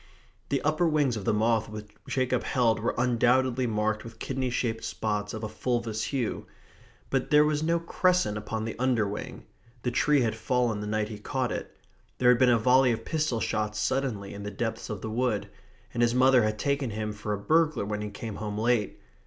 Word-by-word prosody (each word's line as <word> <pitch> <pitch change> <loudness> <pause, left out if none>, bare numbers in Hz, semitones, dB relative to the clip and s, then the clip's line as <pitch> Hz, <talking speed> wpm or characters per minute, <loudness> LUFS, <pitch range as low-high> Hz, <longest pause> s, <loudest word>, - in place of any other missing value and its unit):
The 140 - 0
upper 155 +3 +2
wings 145 -6 +2
of 105 -3 -5
the - - +3
moth 110 +1 +1
which 105 -1 -8 0.2
Jacob 130 -1 0
held 115 -4 +1
were 115 - -1
undoubtedly 125 +1 +2
marked 110 -1 0
with 115 -1 -11
kidney 130 +1 -2
shaped 115 -2 -2
spots 105 -2 -2
of 110 0 -6
a - - -1
fulvous 115 -1 -2
hue. 130 -6 -2 0.6
But 135 -1 0
there 150 0 +6
was 150 0 0
no 165 +2 +1
crescent 180 - +1
upon 110 +1 -4
the 115 - -4
underwing. 115 -6 -1 0.4
The 125 - 0
tree 145 +3 +3
had 115 -3 +1
fallen 120 -2 0
the 105 - -4
night 105 0 -1
he 105 -2 -7
caught 130 +2 -2
it. - - -6 0.4
There 125 - +4
had 125 -1 +5
been 130 - +5
a 120 - +5
volley 125 +3 +4
of 115 - -3
pistol 155 -7 0
shots 105 -1 -1
suddenly 110 -3 -1
in 100 - -7
the 105 - -4
depths 110 +3 -4
of 105 -2 -5
the 110 - -4
wood. 120 -2 0 0.4
And 120 - -1
his 120 0 +3
mother 130 0 +5
had 110 -1 0
taken 140 +1 0
him 105 0 -3
for 105 0 -5
a - - -1
burglar 155 +1 +2
when 105 0 -3
he 105 - -4
came 105 0 -7
home 105 -1 -4
late. 110 -2 +1
115 Hz, 205 wpm, -28 LUFS, 105-130 Hz, 0.6 s, there